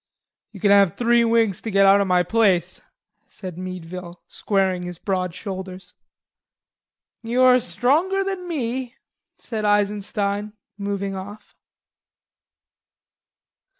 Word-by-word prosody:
"You 205 - -11
kin 200 +2 +3
have 200 -4 +5
three 235 0 +3
winks 225 -4 +2
to 225 - -5
get 195 -1 +4
out 195 +1 +6
o' - - +1
my 180 -1 +3
place," 185 -3 +1 0.5
said 185 -4 -8
Meadville, 180 -1 -8
squaring 190 -3 0
his 180 -1 -7
broad 185 -2 -2
shoulders. 190 -2 -7 1.3
"You 240 +2 +1
are 255 0 +6
stronger 285 - +1
than 385 -2 -4
me," 255 -5 -3 0.4
said 220 -2 -5
Eisenstein, 205 0 0 0.2
moving 200 -1 -3
off. 205 +2 -9
200 Hz, 115 wpm, -22 LUFS, 185-230 Hz, 1.3 s, out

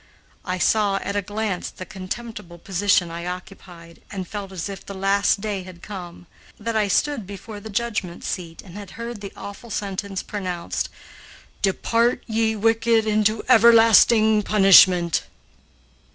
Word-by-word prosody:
I 185 -1 -2
saw 205 +1 +2
at 200 - -4
a 205 - +1
glance 205 -1 -3
the 185 - -9
contemptible 190 -1 -7
position 185 -1 +1
I 170 +1 -6
occupied 180 -2 -10
and 190 -3 -6
felt 200 -1 -6
as 185 -2 -5
if 195 -1 -8
the 200 - -9
last 195 +1 +1
day 205 -2 -3
had 185 -1 -13
come, 180 -4 -9 0.3
that 230 +1 -3
I 215 -2 +2
stood 230 +1 0
before 205 +2 -9
the 220 +2 -10
judgment 210 -5 -3
seat 170 -3 -5
and 180 - -14
had 200 -2 -9
heard 235 -2 -6
the 200 - -7
awful 215 +4 -9
sentence 200 -2 -4
pronounced, 185 -4 -4 0.7
"Depart 230 +5 +1
ye 220 -1 0
wicked 225 +1 +2
into 215 0 +1
everlasting 225 -1 +6
punishment." 185 -4 +5
200 Hz, 145 wpm, -22 LUFS, 185-220 Hz, 0.7 s, everlasting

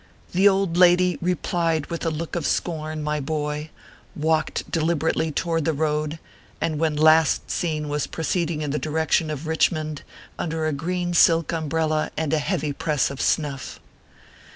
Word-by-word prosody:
The 195 +3 +5
old 190 -3 0
lady 180 0 +5
replied 170 -2 0
with 170 - -3
a - - +3
look 160 +2 -4
of 170 -4 -1
scorn, 155 -2 -2
my 150 0 -1
boy, 150 +1 -3 0.5
walked 160 +1 -1
deliberately 160 -1 0
toward 165 +1 -1
the 160 - +1
road, 150 +1 -1 0.4
and 155 -2 -1
when 160 -2 +1
last 155 0 +4
seen 155 -3 -1
was 145 0 -1
proceeding 160 -1 -2
in 145 - -2
the 150 - -1
direction 160 +1 0
of 150 -1 -4
Kichmond 155 -1 0 0.4
under 160 -1 -2
a 155 - 0
green 175 +4 -2
silk 165 -1 +4
umbrella 155 -1 0
and 160 -2 -1
a 155 - +3
heavy 155 -3 -1
press 145 -1 0
of 140 - -6
snuff. 140 -4 -1
160 Hz, 155 wpm, -24 LUFS, 150-165 Hz, 0.5 s, The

